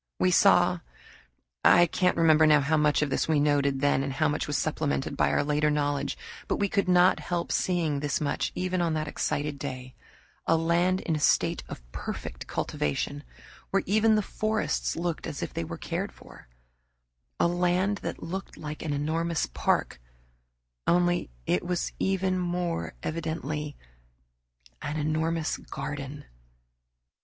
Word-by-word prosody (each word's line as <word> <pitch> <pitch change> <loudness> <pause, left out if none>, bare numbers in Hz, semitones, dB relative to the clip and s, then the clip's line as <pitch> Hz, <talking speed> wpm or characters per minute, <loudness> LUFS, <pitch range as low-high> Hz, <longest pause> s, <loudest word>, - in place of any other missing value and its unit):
We 185 - +3
saw 175 -1 +5 0.8
I 175 - +7
can't 180 +2 +1
remember 160 -1 +5
now 150 -1 +6
how 150 +3 +1
much 150 -1 +3
of 145 - -2
this - - 0
we 155 -2 +3
noted 140 -2 +2
then 145 -1 +3
and 135 0 -2
how 155 +4 +2
much 150 -1 -1
was 150 - 0
supplemented 145 -3 -1
by - - +2
our - - +2
later 150 +1 +2
knowledge, 145 -1 0 0.3
but - - +1
we 200 -1 0
could 200 -2 +1
not 180 +1 +5
help 175 -1 -3
seeing 165 -6 +1
this 145 -1 -1
much, 150 - -1
even 185 0 -1
on 165 -2 +1
that 155 -1 -2
excited 145 -1 -2
day 130 -3 -6 0.5
a 165 - +4
land 175 +3 +2
in 165 - -1
a - - -1
state - - +2
of - - -8
perfect - - -6
cultivation, 145 - -2 0.5
where 195 - +1
even 215 +2 +4
the 215 - +2
forests 215 -7 -1
looked 170 -1 -3
as 145 -3 -4
if - - -5
they 165 - -2
were 165 +1 -6
cared 180 +5 -3
for; - - -15 0.9
a - - +4
land 180 +3 +1
that - - -5
looked 190 +3 -6
like 150 0 -6
an 155 -3 -2
enormous 160 +3 0
park, - - -1 0.9
only 175 - +2 0.2
it 90 - +1
was 180 -1 -1
even 190 -1 +1
more 175 -1 -2
evidently 155 -2 -3 1.0
an 150 - -3
enormous 155 +1 0
garden. 140 0 -6
160 Hz, 155 wpm, -28 LUFS, 145-175 Hz, 1.0 s, I